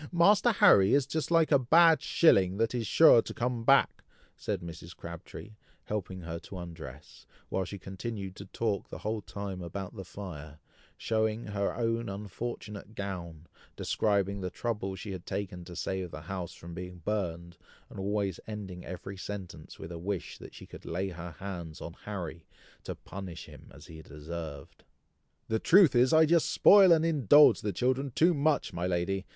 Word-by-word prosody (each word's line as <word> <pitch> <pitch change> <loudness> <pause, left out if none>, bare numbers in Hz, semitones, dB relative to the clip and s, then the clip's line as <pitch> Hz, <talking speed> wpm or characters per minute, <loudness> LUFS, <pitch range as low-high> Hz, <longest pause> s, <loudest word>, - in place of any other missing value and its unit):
Master 200 +7 +5
Harry 125 - +6
is 140 -2 +3
just 155 +3 -3
like 165 -2 +3
a 140 - +6
bad 160 +5 +5
shilling 95 - +4
that 115 +2 +1
is 120 -3 -2
sure 155 -4 +7
to - - -8
come 120 -1 -2
back," 135 +3 +3 0.3
said 100 -3 -3
Mrs. 85 0 -9
Crabtree, 85 +5 -9 0.3
helping 95 -3 -4
her 85 0 -5
to 95 +3 -10
undress, 80 -5 -10 0.2
while 95 - -1
she 100 - -7
continued 95 0 -6
to 100 - -8
talk 105 0 -2
the - - -7
whole 110 0 -3
time 95 +1 -6
about 95 +4 -6
the 95 - -6
fire, 80 -6 -9 0.4
showing 110 0 -1
her 100 -1 -2
own 115 -1 -1
unfortunate 105 +1 -6
gown, 85 -6 -6 0.3
describing 100 -2 0
the 90 - -3
trouble 105 -2 -3
she 100 +1 -7
had 95 -2 -6
taken 95 -2 -5
to 85 - -10
save 95 0 -3
the 80 - -8
house 90 +1 -6
from 85 +1 -10
being 90 -1 -8
burned, 85 -5 -3 0.3
and - - -10
always 100 -2 -1
ending 100 -5 -7
every 95 +2 -7
sentence 95 -5 -8
with 80 - -9
a 85 - -6
wish 95 +1 -4
that - - -12
she - - -11
could - - -12
lay 95 +4 -3
her 85 -2 -8
hands 85 -5 -7
on 85 - -7
Harry 85 -6 -6 0.4
to - - -5
punish 95 -3 -8
him - - -14
as 70 +2 -14
he 80 -3 -11
deserved. 75 -1 -8 0.6
"The 110 0 0
truth 180 - +6
is, 125 +2 +5
I 160 0 +6
just 165 +1 +3
spoil 195 -3 +7
and 165 -1 +5
indulge 150 - +6
the 105 - -1
children 130 +7 0
too 165 +8 +3
much, 150 0 +1
my 85 +1 -2
lady!" 95 +2 -1
100 Hz, 175 wpm, -30 LUFS, 85-115 Hz, 0.6 s, sure